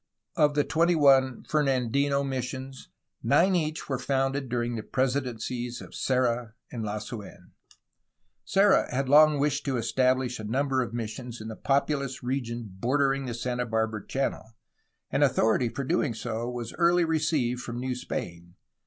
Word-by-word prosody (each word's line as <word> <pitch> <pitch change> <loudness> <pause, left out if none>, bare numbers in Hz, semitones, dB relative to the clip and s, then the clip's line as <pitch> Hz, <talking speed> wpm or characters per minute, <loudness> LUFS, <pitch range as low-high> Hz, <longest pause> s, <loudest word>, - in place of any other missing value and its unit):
Of 150 -3 +3
the 145 - +3
twenty 165 +4 +2
one 135 -4 +4
Fernandino 140 -1 +1
missions 130 0 -5 0.3
nine 185 +2 +3
each 155 -2 -2
were 135 -3 -2
founded 135 0 -1
during 120 0 -1
the 110 - -3
presidencies 125 -1 -2
of - - -11
Serra 120 -3 0 0.2
and 115 -2 -4
Lasu^n. 105 0 -7 0.9
Serra 195 +1 +3
had 135 +1 -1
long 150 +2 +6
wished 145 +1 0
to 135 -2 0
estabhsh 125 +1 +1
a - - -6
number 130 +4 0
of 120 - -3
missions 120 +1 -5
in 110 0 -7
the 110 - -6
populous 140 -1 -1
region 120 -3 -3
bordering 135 +3 +1
the 120 - -4
Santa 125 +1 -2
Barbara 110 -2 -1
Channel, 115 -4 -3 0.6
and - - +2
authority 115 +2 +2
for 140 - -4
so - - -7
doing 150 -6 +1 0.4
was 120 -2 -5
early 170 0 +4
received 155 -6 0
from 120 -1 -6
New 130 0 -2
Spain. 85 -7 -6
130 Hz, 150 wpm, -27 LUFS, 120-140 Hz, 0.9 s, long